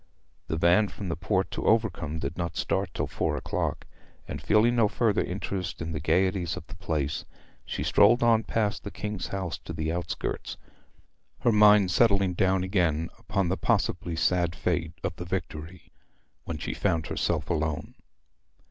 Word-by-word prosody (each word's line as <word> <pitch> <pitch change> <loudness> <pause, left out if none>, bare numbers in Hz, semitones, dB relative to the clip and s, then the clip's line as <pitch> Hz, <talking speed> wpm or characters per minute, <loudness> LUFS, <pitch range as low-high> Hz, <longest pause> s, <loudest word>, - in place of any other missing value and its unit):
The 80 - -2
van 85 +6 +4
from 100 -1 -7
the 80 - -1
port 95 +4 0
to - - -4
Overcombe 95 -9 +1
did 75 +1 -4
not 85 -1 -3
start 95 -2 -1
till - - -2
four - - -1
o'clock, - - -2 0.4
and - - -5
feeling 115 +3 +3
no 115 -3 +4
further 110 0 +1
interest 95 -1 -4
in 80 0 -4
the 75 - -3
gaieties 90 +3 +1
of - - -8
the - - -11
place, 75 -3 -2 0.4
she - - -3
strolled 120 +4 +5
on 115 -1 +5
past 105 -2 -1
the 100 - -5
King's 105 -3 -4
house 95 -4 -4
to 85 - -8
the 80 0 -2
outskirts, 85 +1 -3 0.8
her 120 - +4
mind 105 -3 +6
settling 100 -3 +3
down 95 +1 +2
again 85 -4 0
upon 95 -3 -1
the 95 - 0
possibly 85 - 0
sad 85 +1 +1
fate 85 -2 -1
of - - -2
the 90 - -6
Victory 85 -1 -5 0.5
when 80 - -4
she - - -4
found 80 -2 0
herself - - -1
alone. 80 -2 -2
90 Hz, 165 wpm, -27 LUFS, 85-100 Hz, 0.8 s, mind